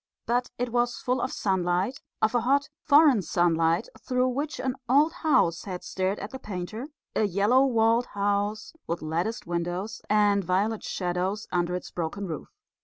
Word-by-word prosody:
But 245 +1 0
it 245 -1 -2
was 240 0 +1
full 250 0 -1
of 260 - -1
sunlight, 190 +5 0 0.2
of 220 - +3
a 240 - +2
hot, 280 +4 +2
foreign 290 -6 +6
sunlight, 165 +1 +2
through 255 0 +1
which 285 +4 -3
an 260 -1 -1 0.2
old 295 +5 +4
house 175 - +2
had 185 -3 -5
stared 190 +2 -1
at 205 - -6
the 265 - -7
painter, 210 +3 -5 0.3
a 215 - +3
yellow 210 +8 +3
walled 230 0 +3
house 205 +2 -1
with 170 -1 -3
latticed 170 +9 -2
windows 175 +5 -3
and 205 -1 +3
violet 200 +5 0
shadows 185 +3 -2
under 175 0 0
its 180 - -6
broken 175 +4 -3
roof. 160 -5 -5
205 Hz, 165 wpm, -27 LUFS, 180-245 Hz, 0.3 s, foreign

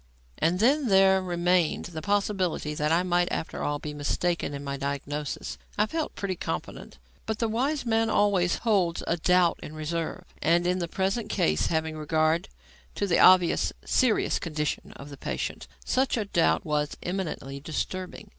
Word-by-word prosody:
And 170 +3 +2
then 270 +5 +3
there 190 -1 +5
remained 175 -2 +1
the 160 -2 -6
possibility 195 -5 0
that 150 +1 0
I 170 +2 +3
might, 175 -1 +1
after - - -3
all, 145 0 -1
be 150 0 -6
mistaken 150 +3 -1
in 140 0 -6
my 140 0 -3
diagnosis. 140 +1 -4 0.2
I 210 - +4
felt 320 +7 -3
pretty 195 -2 -3
confident. - - -5 0.3
But 220 -1 -1
the 230 - 0
wise 265 +6 -1
man 225 -1 +2
always 200 -4 +2
holds 185 -6 +2
a 170 - 0
doubt 180 0 +3
in 155 - -8
reserve. 160 +1 -3 0.2
And, 170 +2 +3
in 180 +1 +1
the 170 - -2
present 195 +5 -1
case, 75 - +1
having 160 -1 -1
regard 155 +3 +1 0.5
to 205 - 0
the 180 -4 +2
obviously 185 -2 +5
serious 255 -5 +2
condition 155 -3 -3
of 145 +1 -11
the 140 - -9
patient, - - -4 0.2
such 260 -1 +1
a 215 - -1
doubt 80 - +2
was 150 -1 -1
eminently 170 -7 -4
disturbing. 185 +7 -5
175 Hz, 165 wpm, -27 LUFS, 155-200 Hz, 0.5 s, there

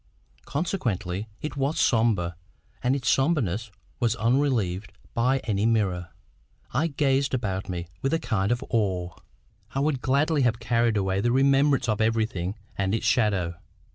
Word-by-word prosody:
Consequently 110 - -2 0.2
it 150 - -4
was 140 +3 0
sombre, 110 -8 +2 0.5
and 130 +1 +2
its 135 -3 -3
sombreness 120 - +1 0.3
was 120 -3 +2
unrelieved 115 -7 +1 0.2
by 125 +3 +2
any 105 -3 0
mirror. 95 -6 0 0.6
I 145 +7 +2
gazed 140 -2 +1
about 95 -6 -3
me 85 -2 -3 0.2
with 135 - 0
a - - +3
kind 105 -8 0
of 120 +2 0
awe. 95 -6 0 0.6
I - - +1
would 140 -2 0
gladly 145 +3 +2
have 120 -3 +2
carried 115 -1 +1
away 95 0 0
the 120 +2 +2
remembrance 135 +1 +3
of 110 0 0
everything 110 -4 0 0.2
and 100 +1 0
its - - -3
shadow. 100 -8 +1
115 Hz, 145 wpm, -26 LUFS, 100-135 Hz, 0.6 s, a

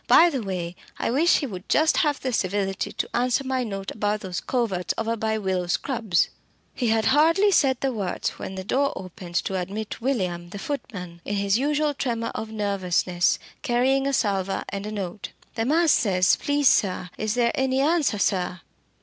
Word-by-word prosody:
By 345 0 +7
the 270 -4 -2
way, 180 -4 -4 0.2
I - - -1
wish 315 +7 +4
he 290 - -2
would 190 -7 -8
just 310 +1 +3
have 295 -2 +2
the 255 -1 -3
civility 195 -1 -1
to - - -4
answer 250 +2 +1
my 260 -1 -1
note 195 -4 -5
about 210 0 -1
those 185 -3 -4
coverts 200 -9 -1
over 225 +1 -1
by 220 0 -1
Willow 190 -3 -1
Scrubs!" 220 - +1 0.4
He 245 - -1
had 220 -1 +2
hardly 330 +8 +4
said 265 -8 +3
the 270 -1 0
words 195 -5 -2
when 190 - -7
the 190 - -5
door 275 +8 +1
opened 180 -1 -9
to 190 +1 0
admit 205 +5 -5
William 180 -9 -1
the 200 - -7
footman, 180 -8 -6
in 205 - -3
his 200 +2 +2
usual 295 +2 +1
tremor 235 -4 -2
of 220 0 -5
nervousness, 185 -4 +1 0.2
carrying 265 +2 +2
a - - +1
salver 195 -6 0
and 200 +1 -4
a - - -4
note. 195 -2 -5 0.2
"The 225 - -1
man 325 +6 +3
says, 185 - +4
please 285 -1 +1
sir, 185 -5 +2
is 215 +1 -1
there 235 -1 +3
any 265 0 +1
answer, 295 -5 +2
sir?" 185 -2 0
220 Hz, 185 wpm, -25 LUFS, 190-265 Hz, 0.4 s, By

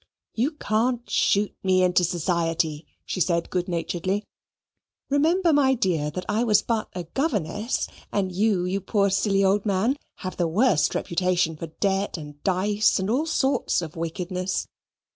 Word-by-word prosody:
"You 260 +8 0
can't 240 -1 -1
shoot 205 +1 +2
me 185 -1 +3
into 180 0 +3
society," 165 -3 -1 0.2
she 185 - -3
said 170 -1 +1
good 180 -1 -1
naturedly. 180 +3 -2 0.9
"Remember, 330 +4 +3
my 270 -2 +4
dear, 170 -9 0
that 180 +4 -5
I 215 +3 +1
was 215 -4 +3
but 225 -2 -1
a 180 - -3
governess, 210 - -1 0.2
and 190 -2 0
you, 190 -1 +1
you 190 +2 -1
poor 200 0 +1
silly 195 0 +2
old 195 +1 +3
man, 215 +7 +1 0.3
have 185 - -4
the 175 - +1
worst 190 - +2
reputation 175 -2 0
for 165 +2 -6
debt, 195 +4 -1
and 145 -2 -10
dice, 205 +3 +2
and 190 +2 -1
all 290 +7 +1
sorts 270 - +1
of 160 -1 -8
wickedness. 180 +3 -3
190 Hz, 155 wpm, -25 LUFS, 175-215 Hz, 0.9 s, my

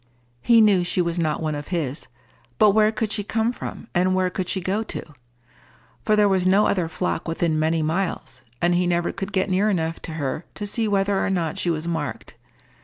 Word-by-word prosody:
He 230 - +5
knew 200 -4 +4
she 175 - -1
was 170 0 0
not 160 -1 -1
one 155 -1 -1
of 145 0 -6
his; 155 -5 -3 0.5
but 210 - +6
where 215 +1 +4
could 220 -1 -2
she 210 - -2
come 225 +3 0
from, - - -7
and 185 +1 +2
where 185 -1 +1
could 185 -1 -3
she 190 - -1
go 190 +4 -1
to? 225 - -5 1.0
For 215 - +3
there 210 -1 +4
was 190 -2 +2
no 195 +3 +4
other 180 -4 0
flock 180 +2 -2
within 165 -1 0
many 160 +1 +1
miles, 160 -5 -2 0.2
and 175 0 +3
he 175 0 +2
never 175 0 0
could 195 +1 -5
get 190 -1 +1
near 195 +3 +2
enough 165 -4 -1
to 160 - -7
her 150 +1 -3
to 205 - -4
see 220 +2 0
whether 200 -1 +1
or - - 0
not 170 -5 -1
she 175 - 0
was 165 0 -2
marked. 160 -5 -4
180 Hz, 215 wpm, -23 LUFS, 165-200 Hz, 1.0 s, but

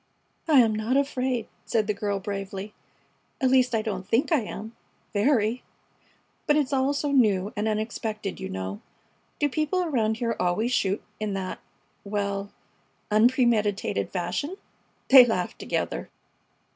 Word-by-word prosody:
"I 295 -5 +7
am 225 -2 +2
not 220 +5 0
afraid!" 260 -4 0 0.2
said 220 -2 0
the 210 - 0
girl, 200 0 -2
bravely. 195 +1 -5 0.7
"At 260 -2 +2
least, 255 -2 +4
I 220 - 0
don't 195 -4 -4
think 250 - +1
I 315 - +5
am 220 +1 -7 0.4
very! 225 +1 +2 0.9
But 295 - +4
it's 290 -2 +1
all 265 +1 +2
so 285 0 -1
new 210 -6 +3
and 210 +1 -1
unexpected, 215 -2 -3
you - - -5
know. 95 +1 -5 0.6
Do 290 - +3
people 310 +6 0
around 225 -9 0
here 230 -1 -1
always 180 +7 +1
shoot 200 -4 0 0.2
in 210 -2 -2
that 190 -1 -4 0.4
well 200 -1 -2 0.6
unpremeditated 215 - +2
fashion?" 185 - -3 0.5
They 265 -1 +11
laughed 200 -7 -2
together. - - -3
220 Hz, 140 wpm, -26 LUFS, 200-255 Hz, 0.9 s, They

